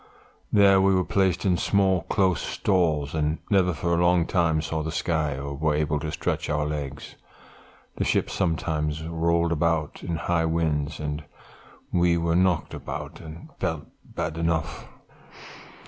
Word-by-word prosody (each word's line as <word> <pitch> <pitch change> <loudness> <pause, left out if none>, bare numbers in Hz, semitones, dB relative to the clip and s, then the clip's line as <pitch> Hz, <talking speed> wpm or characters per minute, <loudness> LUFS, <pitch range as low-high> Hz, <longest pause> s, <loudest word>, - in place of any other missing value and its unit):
There 100 -2 +6
we 95 0 +4
were 90 -1 +1
placed 95 -1 +1
in 90 -2 +3
small 95 -2 +2
close 90 -1 +1
stalls, 80 -7 0
and 75 0 0
never 95 -3 +4
for 85 +2 -1
a 85 +1 +2
long 85 -1 +3
time 85 -3 +1
saw 80 0 -2
the 80 +1 -3
sky, 80 -4 -1
or 70 +1 -5
were 75 +1 0
able 75 0 0
to 75 +1 -4
stretch - - -2
our 75 0 0
legs. 70 -2 -5 0.8
The - - 0
ship - - +1
sometimes 80 -3 -1
rolled 85 +1 +1
about 80 -1 0
in 85 - -3
high 80 +1 0
winds, 80 -2 -1
and 75 0 -4 0.7
we 85 -1 +3
were 85 0 0
knocked 90 -2 +2
about, - - -6
and 80 +1 -10
felt 80 -2 -2 0.2
bad 80 0 -4
enough. 85 -2 -1
80 Hz, 155 wpm, -25 LUFS, 75-85 Hz, 0.8 s, There